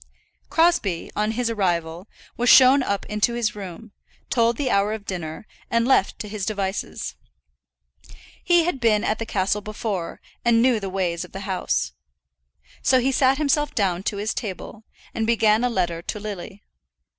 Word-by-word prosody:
Crosbie, 325 - +1
on 210 +1 0
his 245 +1 -1
arrival, 175 -3 -1 0.3
was 245 +1 +1
shown 265 +1 +8
up 200 -6 -2
into 210 +3 0
his 220 -3 -1
room, 200 +2 -9 0.4
told 235 -1 +2
the 275 -3 -1
hour 200 +2 +2
of 215 -2 -7
dinner, 170 -1 -5 0.2
and 230 0 +1
left 260 -7 +3
to 210 - -6
his 210 -1 -5
devices. 195 -1 -3 1.3
He 345 -1 +4
had 330 -5 -1
been 220 -3 +3
at 215 - 0
the 230 - -4
castle 195 +1 0
before, 205 -4 -4 0.2
and 235 -1 +4
knew 240 -1 +3
the 195 -2 -5
ways 180 -3 -1
of 180 - -13
the 195 - -6
house. 185 - -1 0.9
So 260 - +4
he 260 +2 +1
sat 265 0 +3
himself 295 0 +1
down 185 -4 +1
to 205 - -7
his 210 +2 -2
table, 215 0 -6 0.3
and 225 -1 -1
began 225 -1 +3
a 250 - +2
letter 175 -6 -1
to 210 - -5
Lily. 205 -1 -7
215 Hz, 170 wpm, -23 LUFS, 195-235 Hz, 1.3 s, shown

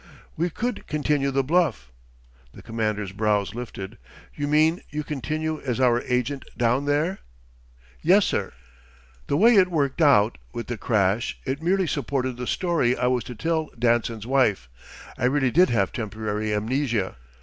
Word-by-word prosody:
"We 170 +3 0
could 240 +7 -4
continue 145 -2 0
the 135 0 +1
bluff." 140 - +1 0.6
The - - -12
Commander's 110 -3 -2
brows 105 -1 0
lifted. 115 -3 -7 0.3
"You 145 -1 -3
mean 155 +3 +3
you 150 0 -4
continue 155 +2 -3
as 125 -2 -2
our 120 -2 +3
agent 125 +2 -1
down 125 +3 +1
there?" 150 +6 0 0.8
"Yes, 190 +5 +5
sir. 95 - -1 0.8
The 140 - +1
way 230 +7 +6
it 185 -2 +5
worked 145 -3 0
out, 115 - +4
with 120 - -4
the 120 - -4
crash, 105 0 +1
it 135 +3 -3
merely 185 +3 +2
supported 135 -5 -2
the 125 -1 -5
story 165 -9 +1
I 125 - 0
was 125 -1 +1
to 125 - -7
tell 160 +4 -1
Danson's 115 -2 +1
wife. 115 - +1 0.5
I 125 - +1
really 135 0 +2
did 180 +6 +5
have 100 -5 +1
temporary 110 -1 -3
amnesia. 110 - -1
130 Hz, 155 wpm, -24 LUFS, 110-150 Hz, 0.8 s, way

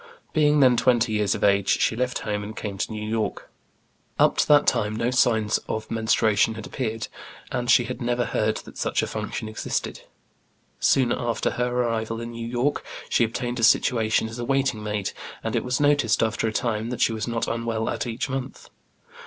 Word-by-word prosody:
Being 150 -1 +4
then 125 -2 +5
twenty 120 -2 +3
years 105 -2 +1
of - - -5
age, 100 -1 +3
she - - +2
left 125 +1 -1
home 105 -1 -1
and 105 +1 -8
came 100 -2 -4
to - - -2
New 105 0 -5
York. 110 -1 -3 0.7
Up - - +4
to - - +2
that 145 -1 +6
time 110 -3 +1
no 115 +2 0
signs 110 -4 +2
of 110 0 -4
menstruation 110 -1 +2
had 110 - -7
appeared, 115 -4 -3 0.4
and 120 0 -2
she 120 - +6
had 125 +2 -6
never 120 0 0
heard 110 0 0
that - - -11
such - - 0
a - - +1
function 110 - -4
existed. 110 - -3 0.8
Soon 130 -3 +3
after 120 -1 -1
her 125 0 -1
arrival 115 -2 -1
in 115 0 -6
New 115 0 -6
York, 125 +5 -1 0.3
she - - +3
obtained 120 +2 -2
a - - -2
situation 110 -1 +3
as 115 +2 -8
a - - -2
waiting 135 -3 0
maid, 105 -2 -2 0.3
and - - -2
it - - 0
was 125 0 -1
noticed, 145 -7 +3
after 110 0 0
a - - -1
time, 110 0 -1
that 125 - -4
she 115 - +3
was 110 +1 -3
not 115 -1 -1
unwell 115 -1 -2
at - - -2
each 115 0 -3
month. 135 -1 -6
115 Hz, 200 wpm, -24 LUFS, 110-125 Hz, 0.8 s, that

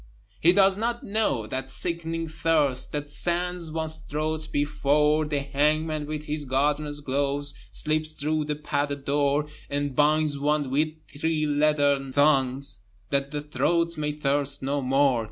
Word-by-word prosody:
He 170 - +6
does 195 0 +4
not 235 +2 -2
know 200 - 0
that 130 +4 -4
sickening 165 +1 -3
thirst 155 -5 +1
That 145 0 -3
sands 175 +2 -2
one's 160 0 -3
throat, 155 +1 -3
before 150 +1 +2
The 150 -2 -1
hangman 150 +2 0
with 150 0 -4
his 150 0 -2
gardener's 145 +2 0
gloves 140 +1 -1 0.2
Slips 155 +7 0
through 155 0 -1
the 150 0 -2
padded 145 -1 -2
door, 145 +1 +2 0.2
And 145 -1 -2
binds 150 0 +2
one 145 -1 0
with 150 +3 +2 0.2
three 155 +1 -1
leathern 145 -2 +2
thongs, 135 -6 +2 0.3
That 140 0 +1
the 145 0 -4
throat 170 +2 0
may 150 -1 -2
thirst 140 -1 +1
no 140 +1 0
more. 135 -1 +3
150 Hz, 145 wpm, -26 LUFS, 140-155 Hz, 0.3 s, He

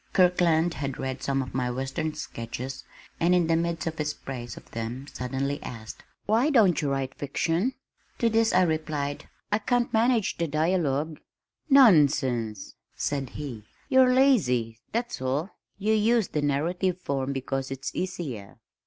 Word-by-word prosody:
Kirkland 175 -2 +3
had 140 -2 -4
read 130 0 -4
some 135 -1 0
of 130 - -9
my 125 -1 0
western 135 +5 -3
sketches 130 -1 -6 0.4
and 175 +2 +4
in 175 -2 +3
the 165 0 +2
midst 170 0 -1
of 160 -1 -4
his 150 0 -1
praise 120 -3 -7
of - - -14
them 115 +4 -5
suddenly 140 +2 -3
asked, 110 -2 -8 0.2
"Why 230 +8 +3
don't 205 - +4
you 145 - 0
write 135 -1 -2
fiction?" 165 - -1 0.4
To 235 - +2
this 225 0 +3
I 185 - +4
replied, 155 -3 -2 0.2
"I 210 - +3
can't 245 +2 0
manage 225 -2 +2
the 170 - +1
dialogue." 155 -1 0 0.5
"Nonsense!" 140 - +4 0.2
said 140 -3 -2
he. 130 -8 -6 0.3
"You're 260 -1 +6
lazy, 125 - +3
that's 235 - -2
all. 140 +8 -1 0.3
You 210 +2 +1
use 220 0 +3
the 150 - -1
narrative 170 +6 0
form 140 -5 -2
because 135 0 -3
it's 135 0 -5
easier. 145 - -5
150 Hz, 155 wpm, -27 LUFS, 135-185 Hz, 0.5 s, You're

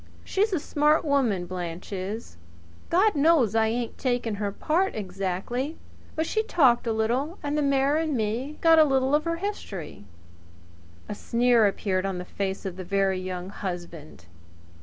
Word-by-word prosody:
She's 415 +3 0
a 360 - +1
smart 300 +2 +2
woman, 245 -11 +1
Blanche 175 +1 -6
is! 200 +4 -4
She's - - -16
saved 85 0 -24
her 335 - +3
money. 385 - +5
God - - -20
knows 285 -7 +4
I 225 0 +3
ain't 235 +1 -3
taking 245 -4 -1
her 200 -1 -1
part 340 - 0
exactly; 195 - -3 0.4
but 320 - 0
she 435 - 0
talked 265 - +3
a - - +2
little, 245 - -1
and 290 0 -1
the 300 - +1
mayor 280 +1 +2
and 315 -4 0
me 235 +7 -2
got 325 -1 +6
a - - +9
little 270 -2 +1
of 300 +2 +2
her 335 0 0
history." 335 - -6 1.0
A - - -4
sneer 235 +1 +3
appeared 195 -1 -1
on 190 -2 -3
the 180 - -5
face 195 +1 -4
of 185 -2 -5
the 185 - -5
Very 195 0 +1
Young 185 0 -5
Husband. 175 - -7
230 Hz, 180 wpm, -26 LUFS, 190-295 Hz, 1.0 s, a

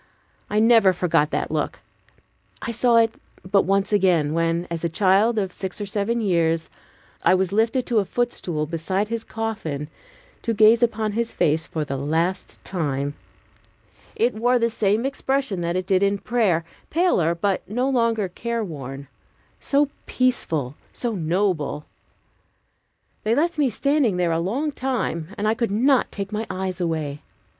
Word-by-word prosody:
I 210 - -1
never 225 -4 +6
forgot 170 -4 +2
that - - -2
look. - - -2 0.8
I 235 - -4
saw 235 +1 +3
it 225 -1 +4 0.3
but 195 +1 +2
once 195 +2 +1
again, 175 -7 +3
when, 165 +1 0
a 170 0 -2
child 200 +6 +3
of 195 -3 0
six 190 +2 -5
or 205 - -3
seven 205 +4 -1
years, 165 -5 +1 0.5
I - - +4
was 185 0 0
lifted 225 +5 +1
to 235 -3 +2
a 200 - 0
footstool 180 -10 -2
beside 185 +6 -2
his 230 -1 -3
coffin 210 -10 -4 0.5
to 230 -2 -1
gaze 220 +2 +6
upon 220 -2 +1
his 230 +2 -2
face 155 +1 +1
for 155 - -3
the 140 -1 -3
last 165 +7 -1
time. 145 -5 -2 1.0
It 240 +2 +2
wore 245 +3 +2
the 230 -1 +1
same 215 +2 +1
expression 270 -7 -1
that 170 +1 -1
it 185 0 -1
did 190 0 +2
in 200 0 +2
prayer; 200 -6 +1 0.2
paler, 290 - +2
but 195 +3 0
no 245 +5 0
longer 230 -6 +1
care 235 +5 -3
worn; 140 -6 -7 0.5
so 285 +1 +2 0.2
peaceful, 165 - 0 0.2
so 240 -2 -2
noble! 165 -4 -1 1.4
They 220 +2 +2
left 330 +2 0
me 280 -3 +3
standing 260 -2 +1
there 175 -2 +1
a 165 - +1
long 250 - -1
time, 250 - -2
and 210 - -1
I 215 - +3
could 230 0 -1
not 250 +6 +2
take 200 0 -5
my 215 +1 -3
eyes 185 0 -3
away. 155 -4 -2
200 Hz, 160 wpm, -23 LUFS, 170-230 Hz, 1.4 s, never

